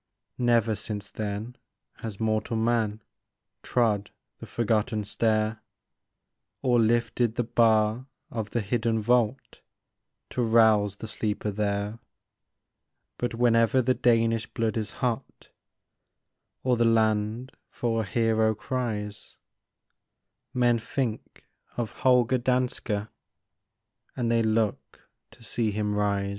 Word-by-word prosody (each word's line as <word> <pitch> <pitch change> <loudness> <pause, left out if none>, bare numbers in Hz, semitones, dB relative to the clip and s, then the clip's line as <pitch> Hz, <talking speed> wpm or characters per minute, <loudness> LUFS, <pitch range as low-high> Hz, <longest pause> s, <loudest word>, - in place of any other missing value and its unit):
Never 120 -2 +3
since 105 -1 -5
then 110 +3 -5 0.4
has 110 -3 -7
mortal 110 0 0
man 110 -2 0 0.6
Trod 105 -5 +1 0.3
the - - -9
forgotten 110 -1 0
stair, 110 +1 0 1.0
Or 125 -2 +3
lifted 115 0 +1
the 120 - +1
bar 110 +1 +2 0.2
of 110 -2 -4
the 120 - -1
hidden 115 +2 0
vault 120 +3 0 0.7
To 125 - -1
rouse 110 -3 +4
the 110 - -8
sleeper 105 -1 -2
there. 100 +1 -2 1.2
But 120 -1 -2
whenever 115 0 +3
the 130 +1 +3
Danish 115 -2 +2
blood 115 -1 -2
is 110 -2 -2 0.2
hot, 120 -2 -4 1.1
Or 125 -2 +2
the 120 - +3
land 110 +2 +1 0.2
for 115 -2 -1
a - - -3
hero 110 +1 +2
cries, 105 -3 -4 1.1
Men 120 -2 +2
think 115 0 -4 0.3
of 120 -3 -2
Holger 125 0 +3
Danske, 125 -4 -1 1.1
And 120 -2 0
they 115 0 +3
look 110 -1 -1 0.2
to 115 +1 -18
see 115 0 -1
him 105 0 -1
rise. 100 -1 0
115 Hz, 110 wpm, -27 LUFS, 105-120 Hz, 1.2 s, rouse